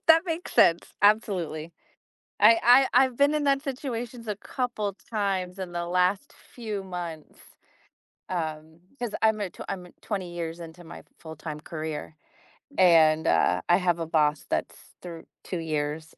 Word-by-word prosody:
That 325 Hz, 0 st, +7 dB
makes 335 Hz, -1 st, -4 dB
sense, 170 Hz, 0 st, +4 dB
absolutely. 180 Hz, -7 st, +1 dB, 0.7 s
I 225 Hz, +2 st, +7 dB, 0.4 s
I 260 Hz, +2 st, +7 dB
I've 255 Hz, -2 st, -7 dB
been 285 Hz, +1 st, +4 dB
in 300 Hz, -1 st, 0 dB
that 275 Hz, -1 st, +2 dB
situations 245 Hz, -4 st, -5 dB
a 210 Hz, -, -2 dB
couple 210 Hz, -2 st, -3 dB
times 195 Hz, -4 st, -2 dB
in 185 Hz, -2 st, -5 dB
the 175 Hz, 0 st, -3 dB
last 180 Hz, +7 st, 0 dB
few 215 Hz, -5 st, -7 dB
months, 175 Hz, -4 st, -7 dB, 0.9 s
um, 160 Hz, -2 st, -5 dB, 0.2 s
'cause 240 Hz, -4 st, -4 dB
I'm 220 Hz, -1 st, +3 dB
a 200 Hz, -3 st, -2 dB
tw -, -, -17 dB
I'm 180 Hz, -2 st, -5 dB
20 185 Hz, -5 st, -4 dB
years 170 Hz, 0 st, -5 dB
into 170 Hz, +1 st, -10 dB
my 160 Hz, -, -10 dB, 0.2 s
full 160 Hz, -1 st, -10 dB
time 150 Hz, 0 st, -7 dB
career 155 Hz, -1 st, -6 dB, 0.6 s
and, 160 Hz, -4 st, +5 dB
uh, 90 Hz, +2 st, +2 dB
I 175 Hz, -, +7 dB
have 175 Hz, -2 st, +1 dB
a 165 Hz, -, -3 dB
boss 150 Hz, -2 st, +1 dB
that's -, -, -2 dB, 0.2 s
through 170 Hz, -2 st, -9 dB, 0.2 s
2 185 Hz, -, -5 dB
years, 155 Hz, -1 st, -3 dB
180 Hz, 155 wpm, -26 LUFS, 160-215 Hz, 0.9 s, That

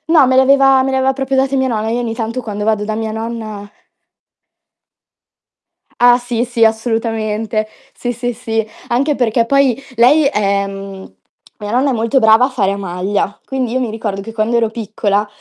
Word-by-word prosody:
No, 295 Hz, -4 st, +7 dB
me 260 Hz, 0 st, +2 dB
l'aveva 270 Hz, 0 st, +5 dB
me 270 Hz, -, -1 dB
l'aveva 265 Hz, 0 st, +2 dB
proprio 270 Hz, 0 st, -2 dB
date 270 Hz, +1 st, +1 dB
mia 265 Hz, 0 st, +1 dB
nonna. 220 Hz, -2 st, -2 dB
Io 240 Hz, +2 st, -1 dB
ogni 230 Hz, -2 st, -3 dB
tanto 230 Hz, +2 st, -3 dB
quando 210 Hz, -2 st, -5 dB
vado 215 Hz, -1 st, 0 dB
da 215 Hz, 0 st, -3 dB
mia 220 Hz, -1 st, -3 dB
nonna 220 Hz, -2 st, -6 dB, 2.3 s
Ah, 245 Hz, 0 st, +6 dB
sì, 240 Hz, -1 st, -2 dB
sì 240 Hz, -2 st, 0 dB
assolutamente. 220 Hz, -1 st, -1 dB, 0.3 s
Sì, 245 Hz, -, -3 dB
sì, 245 Hz, +1 st, -3 dB
sì. 225 Hz, -2 st, -2 dB, 0.2 s
Anche 280 Hz, +5 st, +1 dB
perché 235 Hz, -2 st, +1 dB
poi 275 Hz, -1 st, +2 dB
lei 275 Hz, +6 st, +5 dB
è 200 Hz, -6 st, +1 dB
mhmm, 195 Hz, -, -9 dB, 0.4 s
mia 205 Hz, -1 st, -5 dB
nonna 260 Hz, +4 st, +2 dB
è -, -, 0 dB
molto 230 Hz, +3 st, +1 dB
brava 220 Hz, +2 st, +5 dB
a 270 Hz, -, -3 dB
fare 205 Hz, -7 st, 0 dB
a 200 Hz, -, -5 dB
maglia, 195 Hz, +2 st, -2 dB
quindi 260 Hz, -3 st, -3 dB
io 255 Hz, -, 0 dB
mi 245 Hz, -3 st, -2 dB
ricordo 215 Hz, -3 st, -4 dB
che 225 Hz, +3 st, -8 dB
quando 225 Hz, +1 st, 0 dB
ero 230 Hz, -2 st, +1 dB
piccola, 210 Hz, -2 st, -1 dB
230 Hz, 185 wpm, -16 LUFS, 215-255 Hz, 2.3 s, No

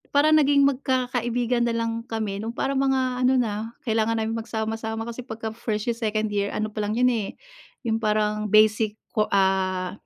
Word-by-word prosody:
Parang 300 Hz, +2 st, +5 dB
naging 285 Hz, -2 st, +5 dB
magkakaibigan 245 Hz, -3 st, 0 dB
na 235 Hz, -, +1 dB
lang 230 Hz, 0 st, -2 dB
kami, 220 Hz, -4 st, -3 dB
nung 225 Hz, -, -3 dB
parang 270 Hz, +3 st, -2 dB
mga 260 Hz, -2 st, +1 dB
ano 255 Hz, +1 st, +4 dB
na, 220 Hz, -1 st, -2 dB, 0.2 s
kailangan 225 Hz, 0 st, +1 dB
naming 220 Hz, +1 st, -1 dB
magsama-sama 220 Hz, 0 st, -3 dB
kasi 235 Hz, +1 st, -6 dB
pagka 225 Hz, -2 st, -6 dB
first 215 Hz, -2 st, -3 dB
year, 235 Hz, -, +1 dB
second 215 Hz, -2 st, -1 dB
year, 200 Hz, 0 st, 0 dB
ano 215 Hz, 0 st, -2 dB
pa 215 Hz, 0 st, -4 dB
lang 215 Hz, +3 st, -1 dB
yun 250 Hz, -, +5 dB
eh, 225 Hz, -5 st, 0 dB, 0.6 s
yung 225 Hz, -, +2 dB
parang 210 Hz, -1 st, 0 dB
basic 215 Hz, 0 st, +4 dB, 0.3 s
ah, 190 Hz, -1 st, +1 dB
225 Hz, 175 wpm, -24 LUFS, 215-245 Hz, 0.6 s, Parang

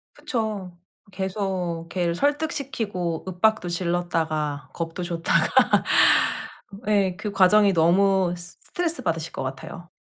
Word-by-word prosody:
그쵸. 215 Hz, -7 st, -3 dB, 0.4 s
계속 185 Hz, -3 st, -3 dB
걔를 175 Hz, -1 st, -1 dB
설득시키고 255 Hz, -, -2 dB
윽박도 185 Hz, +1 st, +1 dB
질렀다가 165 Hz, -4 st, -2 dB
겁도 165 Hz, +1 st, -4 dB
줬다가. 170 Hz, -1 st, +1 dB, 1.4 s
예 195 Hz, -3 st, +2 dB
그 210 Hz, -, -4 dB
과정이 200 Hz, +1 st, +5 dB
너무 185 Hz, +2 st, +3 dB
스트레스받으실 175 Hz, -, -3 dB
것 -, -, -4 dB
같아요. 160 Hz, +6 st, -7 dB
180 Hz, 245 characters per minute, -24 LUFS, 170-205 Hz, 1.4 s, 과정이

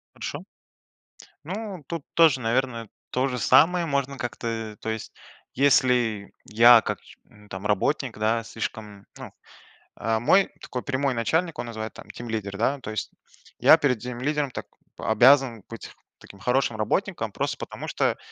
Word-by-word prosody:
Хорошо. -, -, -5 dB, 1.0 s
Ну, 190 Hz, 0 st, -6 dB
тут 165 Hz, -4 st, -5 dB
тоже, 160 Hz, -5 st, +5 dB
наверное, 115 Hz, -1 st, -1 dB, 0.2 s
то 130 Hz, +2 st, 0 dB
же 125 Hz, -2 st, -3 dB
самое 175 Hz, -, +4 dB
можно 140 Hz, -2 st, -1 dB
как-то, 120 Hz, -1 st, -5 dB
э, 115 Hz, -2 st, -4 dB
то 110 Hz, -, -5 dB
есть 110 Hz, -1 st, -5 dB, 0.4 s
если 125 Hz, -6 st, +2 dB
я 115 Hz, +2 st, +7 dB
как, -, -, -3 dB, 0.3 s
м, 105 Hz, 0 st, -19 dB
там 95 Hz, +2 st, -7 dB
работник, 115 Hz, +5 st, 0 dB
да, 110 Hz, +2 st, +1 dB
слишком, 105 Hz, -3 st, -7 dB
ну, -, -, -10 dB, 0.7 s
э. 110 Hz, +1 st, 0 dB
Мой 190 Hz, -, +4 dB
такой 125 Hz, -, -5 dB
прямой 135 Hz, 0 st, 0 dB
начальник, 160 Hz, +8 st, 0 dB
он -, -, -4 dB
называется 110 Hz, -1 st, -7 dB
там -, -, -22 dB
тимлидер, 110 Hz, -4 st, -5 dB
да, 130 Hz, +6 st, 0 dB
то 125 Hz, -, -8 dB
есть. 110 Hz, -, -4 dB, 0.5 s
Я -, -, +7 dB
перед 135 Hz, -7 st, +1 dB
тимлидером 130 Hz, +4 st, -2 dB
так -, -, -6 dB, 0.3 s
обязан 120 Hz, 0 st, +4 dB
быть 115 Hz, -, -9 dB, 0.3 s
таким 100 Hz, -, -15 dB
хорошим 125 Hz, +1 st, +1 dB
работником, 115 Hz, -, -1 dB
просто -, -, -2 dB
потому -, -, -7 dB
что -, -, 0 dB
120 Hz, 150 wpm, -25 LUFS, 110-140 Hz, 1.0 s, я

